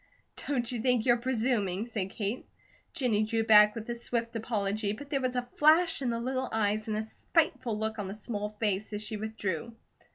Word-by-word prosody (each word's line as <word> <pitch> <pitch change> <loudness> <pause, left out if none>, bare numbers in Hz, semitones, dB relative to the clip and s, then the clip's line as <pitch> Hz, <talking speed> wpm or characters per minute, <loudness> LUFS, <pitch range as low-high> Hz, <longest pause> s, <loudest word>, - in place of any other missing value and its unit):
"Don't 245 -5 0
you 240 -3 -3
think 250 -2 +2
you're 240 -1 +5
presuming?" 230 -5 0
said 215 -5 -3
Kate. 210 +4 -3 0.4
Jennie 230 -6 +1
drew 225 +1 0
back 210 -1 +7
with 225 -1 -6
a 240 - -3
swift 235 0 -2
apology, 210 -2 -1
but 285 +6 -10
there 275 -2 +1
was 255 -1 -1
a 245 0 -1
flash 320 +2 +4
in 255 - 0
the 230 0 -1
little 260 +2 -2
eyes 215 0 0
and 215 -1 -1
a 215 - -1
spiteful 255 -1 0
look 220 0 -2
on 200 - -3
the 195 - -6
small 210 -1 -4
face 210 -1 -2
as 210 +1 -3
she 215 +1 -4
withdrew. 220 -1 -4
225 Hz, 200 wpm, -30 LUFS, 210-245 Hz, 0.4 s, back